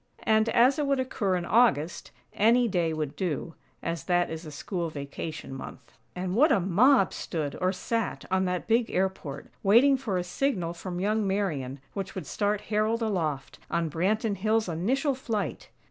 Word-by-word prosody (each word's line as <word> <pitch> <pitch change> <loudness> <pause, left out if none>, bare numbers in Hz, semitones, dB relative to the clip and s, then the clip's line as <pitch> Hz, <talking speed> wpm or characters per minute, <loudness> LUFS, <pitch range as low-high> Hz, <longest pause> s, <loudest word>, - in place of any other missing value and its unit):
And, 220 +1 +3
as 250 +5 +4
it 290 - 0
would 275 -1 +2
occur 210 -7 0
in 175 -1 -2
August, 175 -7 +2 0.2
any 235 +3 +4
day 175 -5 0
would 155 -3 -3
do, 165 -3 -3 0.3
as 165 -3 -3
that 175 -1 +1
is 160 0 -6
a - - -7
school 170 +3 -3
vacation 145 0 -6
month. 135 - -9 0.2
And 180 0 -3
what 295 +6 +5
a 230 - +4
mob 195 +5 +4
stood, 150 -4 -3
or 185 0 +2
sat, 225 +3 -2
on 190 0 +2
that 180 -1 -2
big 230 +1 +2
airport, 180 -7 -2
waiting 245 +8 +5
for 225 -8 -2
a 180 - -1
signal 180 -2 -1
from 175 +1 -6
young 210 +2 +1
Marian 150 -10 -2
which 195 -1 -5
would 185 -5 -5
start 205 +6 -1
Harold 220 +2 0
aloft, 160 -10 -2
on 170 -1 -1
Branton 200 - 0
Hills' 215 +2 +1
initial 250 - 0
flight! 215 - -3
190 Hz, 175 wpm, -28 LUFS, 170-225 Hz, 0.3 s, what